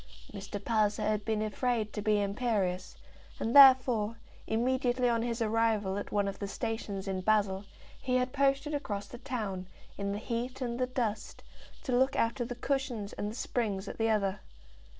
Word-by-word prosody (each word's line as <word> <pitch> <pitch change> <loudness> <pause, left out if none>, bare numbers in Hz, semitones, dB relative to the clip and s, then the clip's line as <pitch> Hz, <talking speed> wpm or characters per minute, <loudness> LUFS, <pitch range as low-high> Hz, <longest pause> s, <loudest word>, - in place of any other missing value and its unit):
Mr. 200 0 -6
Palliser 215 0 +1
had 210 0 0
been 215 -1 0
afraid 215 0 -1
to 210 - -3
be 210 0 +2
imperious, 200 -4 -1 0.4
and 230 - -1
therefore, 255 -5 +7 0.3
immediately 250 +2 +1
on 230 -1 +2
his 235 0 -1
arrival 220 -3 +1
at - - -7
one 205 -1 +1
of 195 - -5
the 200 - -3
stations 205 -3 -4
in 190 -1 -2
Basle, 200 -1 +1 0.4
he 255 -1 0
had 255 0 +1
posted 275 +2 +1
across 205 -9 -3
the 240 +4 -10
town, 215 -8 -4 0.3
in 200 0 -1
the 200 - -2
heat 235 +3 -3
and 240 -2 -3
the 255 - +1
dust, 225 -4 -3 0.4
to 250 - 0
look 265 +2 +3
after 235 +2 +1
the 245 +1 -5
cushions 245 -5 -2
and 205 - -3
the 215 - -7
springs 210 -6 -2
at - - -7
the 225 0 +2
other. 200 -2 +1
225 Hz, 175 wpm, -31 LUFS, 205-250 Hz, 0.4 s, therefore